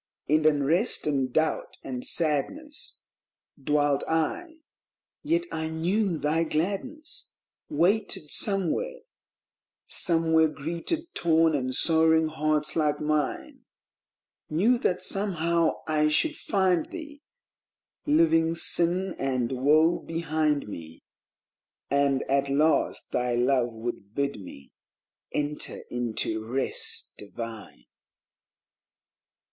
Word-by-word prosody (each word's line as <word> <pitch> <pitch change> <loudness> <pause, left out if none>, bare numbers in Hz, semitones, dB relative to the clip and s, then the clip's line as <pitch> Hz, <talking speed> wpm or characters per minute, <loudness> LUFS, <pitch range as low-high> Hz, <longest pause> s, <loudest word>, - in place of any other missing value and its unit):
In 155 +2 +3
unrest 155 - +1
and 135 -4 0
doubt 155 +4 -1
and 125 -2 -5
sadness 230 - -1 0.6
Dwelt 145 -1 +2
I, 320 - -1 0.7
yet 335 +3 +1
I 160 0 -2
knew 175 +3 0
thy 150 +3 +1
Gladness 200 - -3 0.4
Waited 200 - 0
somewhere; 210 - 0 0.8
somewhere 160 -2 +3
greeted 170 - -4
torn 165 -1 +3
and 130 -3 -1
sorrowing 160 -1 +4
hearts 155 -1 0
like 150 -3 +1
mine; 150 -2 -2 0.8
Knew 215 +11 +2
that 180 -5 0
somehow 170 -5 +1
I 155 -1 +2
should 300 - +2
find 190 - +1
thee, 300 -4 -9 0.9
Leaving 230 - +3
sin 175 +2 +1
and 130 -3 -1
woe 155 +6 +3
behind 155 -4 -1
me, 80 -5 -9 0.9
And 140 -1 +2
at 140 +1 0
last 150 +3 +1
thy 125 -1 0
Love 125 0 +2
would 110 -3 -6
bid 140 -6 -2
me 70 -7 -12 0.6
enter 150 0 -1
into 115 -2 -2
Rest 130 +4 -3
divine. 110 - -8
155 Hz, 100 wpm, -27 LUFS, 140-180 Hz, 0.9 s, sorrowing